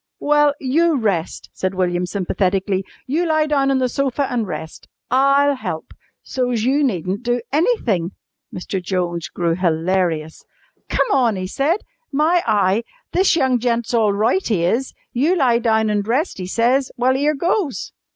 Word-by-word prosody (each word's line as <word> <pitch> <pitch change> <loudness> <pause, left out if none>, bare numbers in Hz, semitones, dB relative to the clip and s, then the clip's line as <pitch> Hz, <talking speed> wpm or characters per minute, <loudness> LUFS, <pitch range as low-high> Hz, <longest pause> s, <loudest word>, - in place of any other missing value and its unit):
"Well, 295 0 +3
you 315 +5 +2
rest," 195 -8 -2
said 190 0 -3
William 180 -1 0
sympathetically. 190 0 -1 0.2
"You 310 +7 0
lie 310 -1 +2
down 280 -2 +1
on 270 - +2
the 255 -1 +1
sofa 275 +2 -1
an' 235 -3 0
rest. 160 -3 -7 0.2
I'll 275 +2 +4
help, 255 - -6 0.3
so's 245 -4 -1
you 275 +4 +2
needn't 190 - -1
do 245 0 0
anything!" 240 - +1 0.4
Mr. 185 +1 -4
Jones 175 -3 -2
grew 170 -1 -1
hilarious. 165 -2 -1 0.5
"Come - - +1
on!" 245 -5 +3
he 185 -1 -3
said. 290 - 0 0.3
"My 315 +5 +2
eye! 205 0 +2 0.3
This 375 -1 +3
young 260 -6 +2
gent's 235 0 -1
all 220 -3 +3
roight, 225 - +1
'e 180 -7 +1
is. 240 +9 -1 0.2
You 295 +9 +2
lie 250 -8 +3
down 220 -2 +2
an' 205 -1 +1
rest, 245 - -1
'e 180 - -4
says! 245 +6 +1
Well, 255 +2 +2
'ere 295 +3 +1
goes!" 340 - -1
240 Hz, 160 wpm, -20 LUFS, 190-275 Hz, 0.5 s, I'll